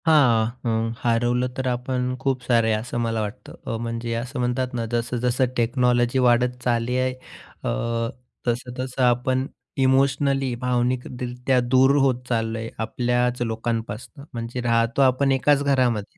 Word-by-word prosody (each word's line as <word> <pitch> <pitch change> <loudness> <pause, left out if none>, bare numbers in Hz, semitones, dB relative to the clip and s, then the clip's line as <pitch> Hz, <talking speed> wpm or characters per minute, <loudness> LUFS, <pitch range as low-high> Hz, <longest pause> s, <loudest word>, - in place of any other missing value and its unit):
हां. 130 -8 +5 0.2
हं. 115 0 0
हरवलं 120 +1 +1
तर 130 -1 -1
आपण 125 0 -1
खूप 135 -1 0
सारे 115 -2 +3
असं 110 +3 -3
मला 115 -1 0
वाटतं. 105 +3 -7
अ, 115 - -1
म्हणजे 115 0 -3
असं 125 +2 -6
म्हणतात 125 +1 -1
ना, 115 -2 -2
जसं-जसं 120 +2 0
टेक्नॉलॉजी 120 +1 +2
वाढत 125 0 +3
चालली 120 0 0
आहे 130 0 +1 0.5
अ, - - -1 0.8
तसं-तसं 125 +2 -2
आपण 125 +1 +2 0.4
इमोशनली, 135 0 +2
भावनिकरीत्या 125 0 0
दूर 130 +3 +4
होत 130 -3 +2
चाललो 115 -1 0
आहे 115 0 -5 0.2
आपल्याच 125 +1 0
लोकांपासनं. 115 +3 -3
म्हणजे 120 +1 -4
राहतो 115 +2 +2
आपण 135 +1 +3
एकाच 145 +2 +3
घरामध्ये. 125 -7 +1
125 Hz, 135 wpm, -23 LUFS, 115-130 Hz, 0.8 s, हां